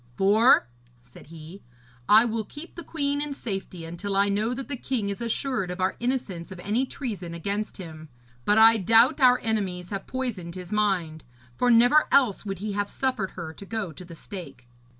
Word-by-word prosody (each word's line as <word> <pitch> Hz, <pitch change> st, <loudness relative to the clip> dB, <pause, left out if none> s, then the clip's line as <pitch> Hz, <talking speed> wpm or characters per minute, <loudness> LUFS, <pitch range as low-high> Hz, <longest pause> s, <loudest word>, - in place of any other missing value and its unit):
'For,' 215 Hz, +5 st, +5 dB, 0.4 s
said 125 Hz, +2 st, -16 dB
he, 165 Hz, +4 st, -11 dB, 0.5 s
'I 220 Hz, +3 st, +7 dB
will 225 Hz, -1 st, -2 dB
keep 295 Hz, -, -11 dB
the 340 Hz, -, -8 dB
queen 285 Hz, -2 st, -1 dB
in 295 Hz, -1 st, -3 dB
safety 195 Hz, -8 st, -5 dB
until 175 Hz, +4 st, -4 dB
I 200 Hz, +1 st, +3 dB
know 215 Hz, +5 st, 0 dB
that 270 Hz, +1 st, -6 dB
the 285 Hz, -, -3 dB
king 240 Hz, -4 st, -2 dB
is 200 Hz, +3 st, -5 dB
assured 235 Hz, -3 st, -2 dB
of 180 Hz, +1 st, -5 dB
our 185 Hz, +1 st, 0 dB
innocence 230 Hz, -9 st, -3 dB
of 185 Hz, -, -8 dB
any 225 Hz, +8 st, 0 dB
treason 195 Hz, -13 st, -5 dB
against 200 Hz, +5 st, -3 dB
him. 160 Hz, -4 st, -10 dB, 0.3 s
But 210 Hz, -, +3 dB
I 225 Hz, +1 st, +7 dB
doubt 230 Hz, -, +4 dB
our 250 Hz, -1 st, +6 dB
enemies 190 Hz, -5 st, -2 dB
have 195 Hz, -1 st, -5 dB
poisoned 215 Hz, -10 st, -4 dB
his 180 Hz, +1 st, -8 dB
mind, 185 Hz, -7 st, 0 dB, 0.3 s
for 250 Hz, -, +1 dB
never 245 Hz, +6 st, +5 dB
else 250 Hz, -8 st, +3 dB
would 195 Hz, -1 st, -3 dB
he 210 Hz, +3 st, -4 dB
have 205 Hz, 0 st, -2 dB
suffered 255 Hz, -8 st, -2 dB
her 160 Hz, -2 st, -6 dB
to 180 Hz, -, -12 dB
go 220 Hz, -6 st, -3 dB
to 160 Hz, -, -11 dB
the 170 Hz, -2 st, -11 dB
stake.' 140 Hz, -10 st, -9 dB
205 Hz, 190 wpm, -26 LUFS, 180-240 Hz, 0.5 s, I